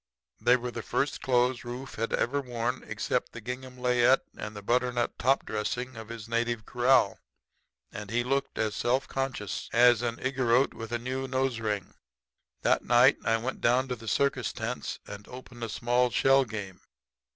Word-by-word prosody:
"They 125 +1 +5
were 125 0 -5
the 115 - -5
first 140 +4 -1
clothes 125 -1 +2
Rufe 125 +2 -7
had 115 +1 -2
ever 140 +4 +1
worn 120 -3 -3
except - - -2
the 120 - -7
gingham 125 +2 -7
layette 125 +1 +4
and 105 0 -7
the 105 - -8
butternut 120 +1 0
top 135 +2 +2
dressing 125 +4 -3
of 110 -1 -9
his 115 -1 -7
native 115 -1 -1
kraal, 125 +2 +3 0.7
and 105 -1 -7
he 120 +2 +1
looked 135 +2 -1
as 110 -1 0
self 130 +3 +1
conscious 130 -7 -3
as 120 -1 +6
an 120 -1 -2
Igorrote 130 -1 +2
with 115 0 -8
a 120 - +1
new 130 +2 -3
nose 130 -2 0
ring. 105 -4 -3 0.7
"That - - +3
night 125 +3 +5
I 115 0 +2
went 120 +3 -4
down 125 +3 +3
to 125 - -1
the 115 -1 -12
circus 130 0 +1
tents 115 +3 -4
and 100 0 -9
opened 125 -1 -10
a 115 - -3
small 120 +3 +1
shell 135 +2 +4
game. 105 -5 -7
120 Hz, 175 wpm, -29 LUFS, 115-130 Hz, 0.7 s, as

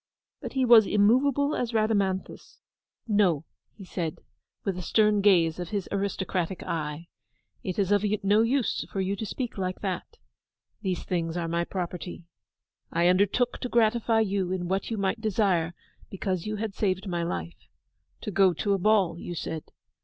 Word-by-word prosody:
But - - -6
he 265 -1 +2
was 230 -3 +8
as - - -4
immoveable 265 +7 +3
as 245 -1 -2
Rhadamanthus. 200 -4 -1 0.5
'No,' 190 -8 +2 0.3
he 195 - -11
said, 170 -4 -3 0.5
with 195 - -1
a 180 - -5
stern 210 +3 +3
gaze 175 -5 +4
of 175 -2 -4
his 200 -4 -2
aristocratic 190 -3 -2
eye. 155 +1 -4 0.6
'It 185 - -3
is 200 -1 +1
of 205 0 +3 0.2
no 205 +2 +4
use 245 +2 +1
for 195 - -3
you 190 +1 0
to 215 +2 -5
speak 245 -4 -4
like 185 -1 -3
that. 195 - -4 0.6
The 190 -3 0
things 170 -1 -2
are 170 -1 -2
my 170 +1 0
property. 175 -1 -5 0.7
I 170 +1 +3
undertook 200 +7 +2
to 250 - -4
gratify 230 -1 +3
you 195 -3 0
in 180 -2 -2
what 190 +2 -1
you 225 - -2
might 200 +3 -1
desire 185 -6 +1 0.3
because 190 -1 -3
you 215 - -2
had 215 -1 -3
saved 190 0 -1
my 175 -2 -1
life. 85 - -5 0.5
To 210 - -4
go 190 -1 +4
to 200 +5 0
a 195 - +1
ball, 190 -4 +3
you 175 - -6
said. 160 -1 -5
195 Hz, 170 wpm, -27 LUFS, 175-215 Hz, 0.7 s, was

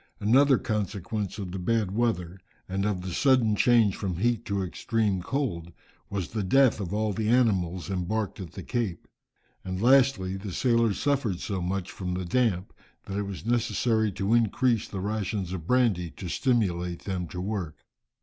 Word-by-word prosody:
Another 135 +5 +5
consequence 105 -1 -3
of 95 -4 -5
the 95 - -4
bad 105 +1 0
weather, 95 -5 -1 0.3
and 95 +2 -1
of 95 -4 -2
the 90 -1 -4
sudden 125 -5 +3
change 115 -3 +4
from 95 -4 -3
heat 120 +3 0
to 100 -1 -1
extreme 95 - -1
cold 90 - -2 0.4
was 95 -3 -3
the 110 - -2
death 125 +5 +4
of 95 -4 -4
all 105 0 0
the 110 +1 -1
animals 95 -8 +2
embarked 100 +3 -2
at 90 -4 -8
the 95 - -7
Cape. 115 -7 -3 0.6
And 95 0 -4
lastly, 120 -6 +3
the 95 -1 -6
sailors 115 -3 +2
suffered 130 -11 0
so 95 -3 -3
much 95 +1 -2
from 90 -1 -4
the 90 0 -3
damp, 100 -2 0 0.3
that 95 - -5
it 100 - -2
was 100 +1 -7
necessary 115 -2 +1
to 100 +4 0
increase 115 0 +2
the 95 - -5
rations 100 -2 -2
of 85 -3 -6
brandy 115 -9 +2
to 95 - -6
stimulate 90 - 0
them 90 -3 -3
to 90 - -7
work. 95 -5 -4
100 Hz, 170 wpm, -27 LUFS, 90-115 Hz, 0.6 s, Another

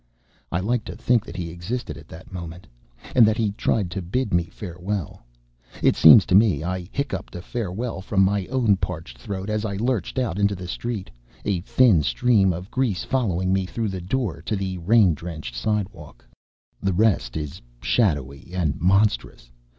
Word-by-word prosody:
I 85 - 0
like 115 +3 0
to - - -7
think 120 -3 +2
that - - -8
he 85 -2 -4
existed 85 +1 -4
at 80 0 -13
that 85 +3 -12
moment, 90 0 -7 0.5
and 125 - +7
that 110 0 +1
he 110 -3 +1
tried 100 -2 0
to 95 - -3
bid 105 +6 -2
me 85 -1 +3
farewell. 90 0 -5 0.6
It - - +5
seems 80 +6 +9
to - - -1
me 95 -7 +4
I 90 0 -3
hiccupped 115 -11 -4
a 90 - -5
farewell 115 -1 -4
from 95 0 +2
my 100 -1 0
own 120 -6 +2
parched 80 -10 -5
throat 95 +7 -5
as 105 0 -1
I 100 -3 -2
lurched 115 0 -1
out 115 -7 -1
into 100 0 +2
the 90 -1 -7
street; 110 +1 -4 0.3
a 100 -4 +1
thin 105 -3 +4
stream 95 - +3
of 90 +3 -6
grease 125 -8 0
following 95 -8 0
me 95 -1 0
through 115 +2 -2
the 95 -2 -5
door 110 +1 -2
to 110 - -2
the 95 -2 -3
rain 100 0 +4
drenched 80 -6 -7
sidewalk. 100 - -3 0.6
The 95 -1 +1
rest 85 - +2
is 75 +2 -5 0.2
shadowy 70 - 0
and 80 -6 -1
monstrous. 90 - +1
95 Hz, 180 wpm, -24 LUFS, 85-110 Hz, 0.6 s, seems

